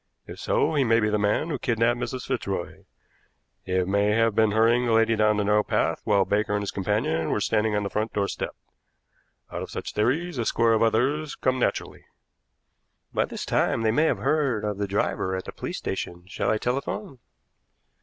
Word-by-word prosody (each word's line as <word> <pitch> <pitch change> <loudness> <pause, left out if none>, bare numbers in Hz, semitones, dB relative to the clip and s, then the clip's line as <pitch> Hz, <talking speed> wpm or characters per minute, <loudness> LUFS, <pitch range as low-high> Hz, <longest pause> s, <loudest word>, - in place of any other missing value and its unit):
If - - -10
so, 160 - +1
he 145 -3 +3
may 115 -2 +3
be 105 -1 +1
the 105 - +1
man 105 +10 +1
who 145 -5 -2
kidnapped 120 0 +1
Mrs. 125 +1 -4
Fitzroy. 95 -6 -4 0.8
He 95 0 0
may 100 +3 +1
have 115 0 +2
been 110 +1 +3
hurrying 115 +3 +3
the 115 - +2
lady 115 0 +4
down 105 -1 +3
the 105 - +1
narrow 105 +1 +3
path - - 0
while 100 -2 +3
Baker 105 0 0
and 105 - -1
his 100 - -3
companion 95 -5 -1
were - - 0
standing 105 0 +1
on 105 - 0
the 100 - -2
front 110 +1 -1
door 100 -1 0
step. - - -4 1.0
Out - - -4
of - - -6
such - - -6
theories 135 +9 0
a 115 - 0
score 115 0 +3
of 110 - +2
others 135 +7 +1
come 130 0 0
naturally." - - -2 1.1
"By - - +2
this - - -6
time 115 - +1
they 110 - +3
may 150 +8 +3
have - - +1
heard 135 -9 0
of 105 -1 -3
the 100 - -1
driver 95 -1 -1
at 95 - -5
the - - -6
police - - -5
station. 85 0 -5
Shall 100 +1 -2
I 110 - +2
telephone?" 135 - -3
110 Hz, 205 wpm, -25 LUFS, 105-120 Hz, 1.1 s, lady